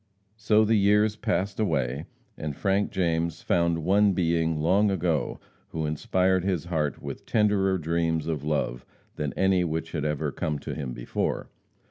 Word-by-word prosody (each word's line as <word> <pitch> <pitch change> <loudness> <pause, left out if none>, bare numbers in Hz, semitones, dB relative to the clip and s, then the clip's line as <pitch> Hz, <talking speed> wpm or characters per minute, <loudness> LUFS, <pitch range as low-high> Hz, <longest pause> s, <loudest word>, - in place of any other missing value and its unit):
So 110 0 +3
the 110 +1 +3
years 105 +1 +3
passed 100 -1 -1
away, 70 - 0 0.3
and 75 -2 -5
Frank 100 +4 +1
James 85 -2 -1
found 85 -2 +1
one 100 +1 +4
being 80 -2 +1
long 95 +7 +3
ago 85 -5 -1 0.3
who 80 -1 -3
inspired 90 +4 +1
his 90 -4 -1
heart 80 -4 -2
with - - -7
tenderer 100 -3 +2
dreams 80 -1 0
of 80 -4 -3
love 75 -5 -1 0.3
than 75 -1 -2
any 95 -1 +2
which 80 0 -3
had 80 -4 -2
ever 75 -1 -1
come 75 -1 -2
to - - -6
him 70 -5 -4
before. - - -3
85 Hz, 155 wpm, -26 LUFS, 75-95 Hz, 0.3 s, one